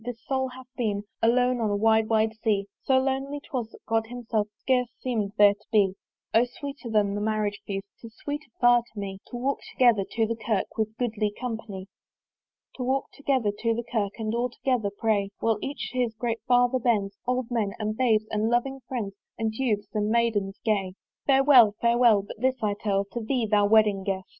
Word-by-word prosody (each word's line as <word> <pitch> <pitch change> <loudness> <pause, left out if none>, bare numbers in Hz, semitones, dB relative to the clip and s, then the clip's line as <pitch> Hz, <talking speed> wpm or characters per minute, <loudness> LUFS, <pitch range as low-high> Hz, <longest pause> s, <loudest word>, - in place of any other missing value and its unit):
this 240 -1 -6
soul 265 -1 0
hath 255 0 -11
been 205 -4 -1 0.2
Alone 245 +1 +3
on 220 - +1
a 205 - 0
wide 220 +1 +3
wide 220 0 +2
sea: 205 -3 +1 0.2
So 265 - +4
lonely 270 +2 -1
'twas, 255 -6 -4
that - - -17
God 225 0 0
himself 230 -3 -2
Scarce 250 -2 +1
seemed 220 -6 -2
there 205 -1 +7
to 205 - -23
be. 200 -4 +4 0.4
O 225 - +6
sweeter 275 +1 -7
than 210 -2 +2
the 205 - -2
Marriage 210 -1 -1
feast, 195 -1 -3
'Tis 230 -1 -12
sweeter 295 -1 -6
far 240 0 +6
to 230 -3 -12
me 195 -1 -5
To 245 - -6
walk 265 +3 -1
together 235 -6 +4
to 225 -1 +2
the 230 +1 -2
Kirk 220 -3 -2
With 220 -1 +1
a - - -30
goodly 220 -4 -1
company. 220 -6 -5 0.9
To 255 - -3
walk 265 +2 -1
together 265 -7 0
to 230 -1 +1
the 235 - -3
Kirk 205 -4 0
And 220 -1 -2
all 240 +2 0
together 245 -4 -1
pray, 205 -1 0
While 225 -2 +1
each 285 +1 -4
to 255 - -3
his 235 -3 0
great 230 0 -2
father 245 +1 +4
bends, 210 -5 +1
Old 250 -1 -1
men, 215 -5 0
and 215 0 -2
babes, 220 -3 +2
and 215 +1 +1
loving 265 +3 0
friends, 220 -7 -3 0.2
And 225 -1 -1
Youths, 220 -4 -1
and 210 -1 0
Maidens 220 -4 +1
gay. 195 -4 0 0.3
Farewell, 265 -6 +6
farewell! 235 -3 +4
but 205 - -10
this 260 0 +2
I 210 -1 +2
tell 200 -1 -1
To 235 - -4
thee, 240 +1 0
thou 205 -1 +3
wedding 210 -2 +4
guest! 190 -1 -2
225 Hz, 200 wpm, -26 LUFS, 210-250 Hz, 0.9 s, there